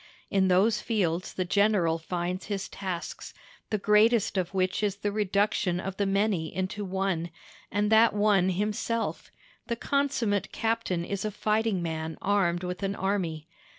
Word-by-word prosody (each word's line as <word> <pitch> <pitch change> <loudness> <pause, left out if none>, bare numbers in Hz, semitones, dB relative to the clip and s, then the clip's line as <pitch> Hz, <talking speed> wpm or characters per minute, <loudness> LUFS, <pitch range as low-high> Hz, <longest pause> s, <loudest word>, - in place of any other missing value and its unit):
In 195 -1 +3
those 200 +4 +3
fields 185 -6 -1
the 185 - -2
general 185 -4 +2
finds 180 +2 -3
his 200 -2 -3
tasks, 185 -3 -6 0.3
the 215 - +1
greatest 210 +2 +3
of 185 -2 -1
which 185 0 0
is 205 -2 0
the 205 0 -2
reduction 200 -2 +1
of 190 0 -5
the 200 - +1
many 195 -4 +1
into 190 +3 -3
one, 190 -3 -1 0.4
and 205 +1 +1
that 225 +1 +6
one 205 -3 +3
himself; 210 +4 -2 0.4
the 235 - -1
consummate 255 -6 0
captain 225 -6 -1
is 200 +1 -3
a 215 - -1
fighting 215 -2 0
man 160 -1 -4
armed 185 -3 +1
with 180 +1 -4
an 195 0 -1
army. 175 -6 -2
195 Hz, 150 wpm, -28 LUFS, 180-210 Hz, 0.4 s, that